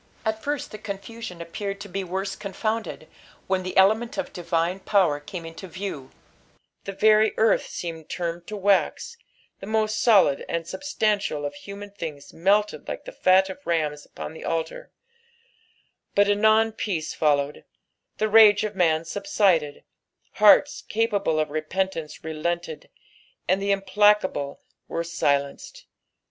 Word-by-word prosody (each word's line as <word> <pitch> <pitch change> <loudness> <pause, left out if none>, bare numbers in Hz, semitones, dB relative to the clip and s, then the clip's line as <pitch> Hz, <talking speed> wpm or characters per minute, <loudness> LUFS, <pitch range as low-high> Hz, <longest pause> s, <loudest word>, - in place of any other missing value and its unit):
At 220 0 -1
first 290 +2 -3
the 215 - -8
confusion 200 -3 -7
appeared 200 +4 -5
to 205 - -7
be 195 +1 -4
worse 190 +2 -3
confounded, 215 +2 -4 0.4
when 190 0 0
the 185 0 -5
element 220 +7 +3
of 285 -1 -4
divine 170 +1 -1
power 185 -8 +2
came 165 +3 -8
into 165 +4 -9
view; 180 -7 -6 0.8
the 195 - -4
very 215 +2 +4
eorth 220 -1 +3
seemed 165 -3 -6
turned 170 -1 -4
to 210 - -5
wax, 200 - +1 0.4
the 195 - -9
most 215 0 0
n>lid 195 - +5
and 170 -1 -2
substantial 210 - -1
of 145 - -4
human 200 +1 -9
things 155 -7 -8
melted 205 +5 +1
like - - -6
ihe - - -7
fat 190 - +4
of 190 - -10
rams 150 -3 -1
upon - - -8
the 160 - -10
altar; 165 - -3 1.3
hut 205 0 +5
anon 220 +2 +4
peace 185 -7 -3
followed, 145 -2 0 0.5
the 215 - +1
rage 215 -1 +7
of 215 -1 -3
man 165 -3 +2
subnided, 170 - 0 0.6
hearts 250 +7 +6
capable 205 -7 0
of 155 -1 -1
repentance 160 0 -3
relented, 160 +1 -4 0.6
and 190 +2 +2
the 200 - -2
implacable 195 -6 +2 0.3
were 170 - -2
wlenced. 145 - -2
195 Hz, 140 wpm, -25 LUFS, 165-215 Hz, 1.3 s, rage